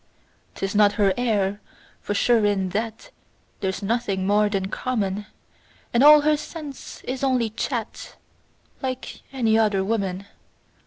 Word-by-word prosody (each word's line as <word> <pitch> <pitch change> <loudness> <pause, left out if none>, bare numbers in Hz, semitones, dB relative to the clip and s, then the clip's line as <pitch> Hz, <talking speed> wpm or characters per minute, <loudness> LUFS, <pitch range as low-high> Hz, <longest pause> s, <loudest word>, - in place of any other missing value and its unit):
'Tis 195 0 -3
not 205 -1 +5
her 200 -2 +2
air, 210 -4 0 0.4
for 205 - -3
sure 230 +1 +3
in 200 -2 +1
that 220 +3 -4 0.5
There's 190 +1 -3
nothing 200 -3 -1
more 205 +1 +3
than 195 -2 -1
common; 210 -4 -2 0.7
And 240 +3 +4
all 300 0 +9
her 300 0 +3
sense 300 -2 -9
is 260 +1 -4
only 250 -5 +1
chat 230 0 -4 0.7
Like 260 -1 -5
any 225 -4 +2
other 205 -3 +2
woman. 195 -2 -2
215 Hz, 130 wpm, -24 LUFS, 200-245 Hz, 0.7 s, all